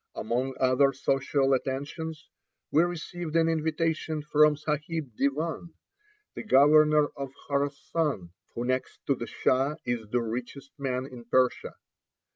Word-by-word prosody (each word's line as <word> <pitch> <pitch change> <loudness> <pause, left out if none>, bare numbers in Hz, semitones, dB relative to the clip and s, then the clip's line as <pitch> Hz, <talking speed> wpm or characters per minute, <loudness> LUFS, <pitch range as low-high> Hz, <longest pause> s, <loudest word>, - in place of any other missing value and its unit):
Among 130 +4 -2
other 130 +2 +4
social 135 0 +1
attentions, 145 +4 -3 0.4
we 155 - +5
received 175 -1 -3
an 165 -1 +4
invitation 160 -1 -1
from 150 0 +4
Sahib 150 -1 -3
Devan, 155 +5 -2 0.6
the - - -6
governor 150 - +5
of 140 -1 -5 0.2
Khorassan, 140 - -1 0.2
who 120 - -2
next 130 +1 -2
to 140 - +3
the 120 -3 -5
Shah 135 +3 +1
is 120 -3 -3
the 120 +1 0
richest 125 +4 -6
man 130 -2 -2
in 125 -3 -11
Persia. 125 +1 +1
140 Hz, 125 wpm, -28 LUFS, 130-155 Hz, 0.6 s, we